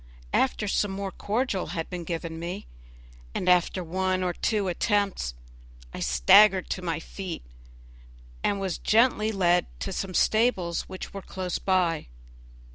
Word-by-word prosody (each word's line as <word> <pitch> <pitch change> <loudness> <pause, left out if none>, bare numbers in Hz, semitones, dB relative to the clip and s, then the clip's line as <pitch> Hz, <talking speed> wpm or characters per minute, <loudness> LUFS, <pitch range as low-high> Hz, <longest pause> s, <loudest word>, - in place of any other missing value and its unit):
After 250 -5 +1
some 205 0 +1
more 195 0 -4
cordial 210 -2 -1
had 165 - -2
been 180 -1 -4
given 165 -1 -4
me, 180 +5 -5 0.7
and 185 - -2
after 180 +1 +3
one 185 +2 0
or 180 -1 0
two 210 0 0
attempts, 195 - 0 0.6
I - - -6
staggered 185 - +5
to 185 - -2
my 165 -3 -2
feet, 185 - -7 1.0
and 200 - +1
was 190 -3 -2
gently 220 -1 +3
led 180 -3 +2
to 195 - -3
some 185 -1 -4
stables 215 -7 +2
which 185 - -7
were 195 - -6
close 185 -2 -4
by. 180 -4 +1
185 Hz, 140 wpm, -27 LUFS, 175-200 Hz, 1.0 s, staggered